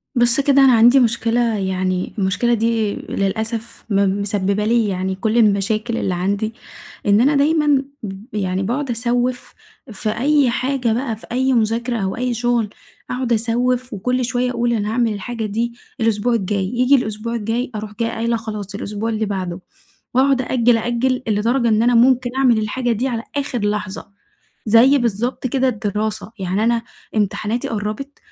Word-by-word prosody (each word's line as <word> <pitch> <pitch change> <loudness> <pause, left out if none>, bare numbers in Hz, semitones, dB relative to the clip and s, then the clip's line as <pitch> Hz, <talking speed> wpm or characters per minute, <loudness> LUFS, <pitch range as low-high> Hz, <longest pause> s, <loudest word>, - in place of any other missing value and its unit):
بُص 240 +1 +3
كده 275 0 +4
أنا 265 -2 +6
عندي 240 +4 +6
مشكلة 235 0 +1 0.2
يعني 185 -1 -2
المشكلة 200 +5 +1
دي 225 -2 +1
للأسف 220 +3 -3
م 200 -1 +1
مسببة 200 0 0
لي 230 0 +2
يعني 190 -1 -2
كُلّ 220 +4 -1
المشاكل 215 +2 +2
اللي 185 - -1
عندي، 200 +5 -1 0.5
إن 205 +1 +4
أنا 285 +4 +3
دايمًا 295 -1 +3 0.2
ب 205 +4 -8
يعني 190 -2 -1
باقعُد 255 +7 -2
أسوِّف 245 +1 -1 0.4
في 215 +1 -3
أي 275 +4 +2
حاجة 250 -1 0
بقى، 235 -1 -2
في 220 - -15
أي 260 +2 +1
مُذاكرة 230 +1 0
أو 190 -3 -2
أي 250 0 -1
شُغل، 240 -2 0 0.4
أقعُد 250 -1 -1
أسوِّف، 245 +2 0
وكُلّ 250 +5 -1
شوية 250 0 0
أقول 240 -1 0
أنا 210 -2 -1
هاعمل 230 0 +1
الحاجة 225 +2 -4
دي 230 +3 -2 0.3
الأسبوع 225 +1 +1
الجاي، 200 -3 0
ييجي 250 +6 +3
الأسبوع 230 -1 -2
الجاي 230 +3 -2
أروح 210 0 -5
جاية 230 -1 +1
قايلة 230 +1 -1
خلاص 210 -3 -6
الأسبوع 210 +2 -3
اللي 220 -1 -1
بعده، 185 -3 -3 0.5
وأقعُد 265 +1 +3
أأجل، 245 -2 +2
أأجل، 240 +3 0
لدرجة 230 +4 +1
إن 220 0 +3
أنا 245 0 +3
ممكن 250 +1 +4
أعمل 255 -4 +4
الحاجة 240 +3 -1
دي 235 +4 0
على 230 -3 -3
آخر 275 -3 -2
لحظة، 205 -1 -5 0.6
زي 235 +6 +6
بالضبط 240 +2 -1
كده 260 +1 +1
الدراسة، 215 -1 -3
يعني 190 +3 -1
أنا 235 0 +2 0.3
امتحاناتي 215 +3 -1
قربت، 215 +6 -4
230 Hz, 160 wpm, -19 LUFS, 210-245 Hz, 0.6 s, أنا